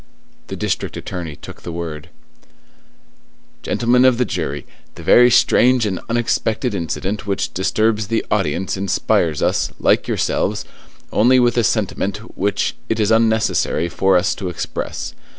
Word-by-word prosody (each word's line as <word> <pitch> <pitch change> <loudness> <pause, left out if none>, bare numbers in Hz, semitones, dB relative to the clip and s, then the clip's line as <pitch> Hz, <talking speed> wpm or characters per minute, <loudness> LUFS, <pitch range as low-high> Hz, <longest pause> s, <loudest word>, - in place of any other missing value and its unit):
The - - -5
district - - -3
attorney 85 -5 -6
took - - -12
the 85 - -7
word:— 80 -3 -6 1.5
"Gentlemen 125 +1 +2
of 130 -2 +5
the 125 - +1
jury, 75 -8 -4 0.3
the - - -10
very 125 0 +6
strange 125 0 +4
and 95 -4 -2
unexpected 120 0 0
incident 100 +4 -3
which 100 - -2
disturbs 110 +3 0
the 115 +1 -1
audience 95 -2 0
inspires 90 -4 0
us, - - +1
like - - +2
yourselves, - - -1 0.5
only 125 +4 +5
with 120 -1 +3
a 120 - +2
sentiment 100 -2 -1 0.2
which 100 +2 -1
it 110 - 0
is 105 0 +2
unnecessary 110 -7 +2
for 95 +2 +2
us 90 +2 +1
to 95 -3 -5
express. 90 - -5
105 Hz, 140 wpm, -19 LUFS, 90-115 Hz, 1.5 s, very